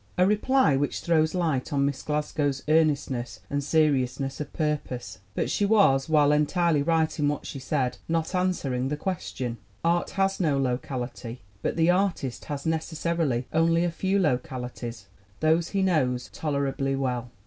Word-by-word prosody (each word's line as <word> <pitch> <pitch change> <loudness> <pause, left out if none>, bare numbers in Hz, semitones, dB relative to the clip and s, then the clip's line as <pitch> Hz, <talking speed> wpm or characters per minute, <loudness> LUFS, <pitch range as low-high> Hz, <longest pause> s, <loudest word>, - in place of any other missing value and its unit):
A 180 - +5
reply 210 - +3
which 145 +1 -1
throws 160 -1 +2
light 160 -8 0
on 140 -1 +2
Miss 140 -1 -2
Glasgow's 150 -2 -1
earnestness 145 -6 +1
and 145 0 0
seriousness 135 -3 +1
of 145 - -6
purpose. 130 - -3 0.2
But - - -1
she - - 0
was, 180 -10 +4
while 150 -2 +5
entirely 150 +1 +2
right 160 +1 +1
in 145 - +2
what 145 0 -2
she 140 - -6
said, 130 -2 -1
not 165 +1 0
answering 150 -9 0
the 150 +2 -2
question. 130 - -4 0.2
Art 170 +1 +2
has 195 0 +1
no 155 -6 +2
locality, 125 -2 -3 0.2
but - - -1
the 165 +1 +4
artist 180 -9 -1
has 145 -2 -5
necessarily 160 -5 -1
only 165 +1 +3
a 175 - 0
few 190 +4 0
localities 125 - -2 0.3
those 160 +2 +2
he 195 -1 0
knows 130 -9 +1
tolerably 140 -2 -1
well. 125 -3 -2
150 Hz, 155 wpm, -26 LUFS, 130-165 Hz, 0.3 s, A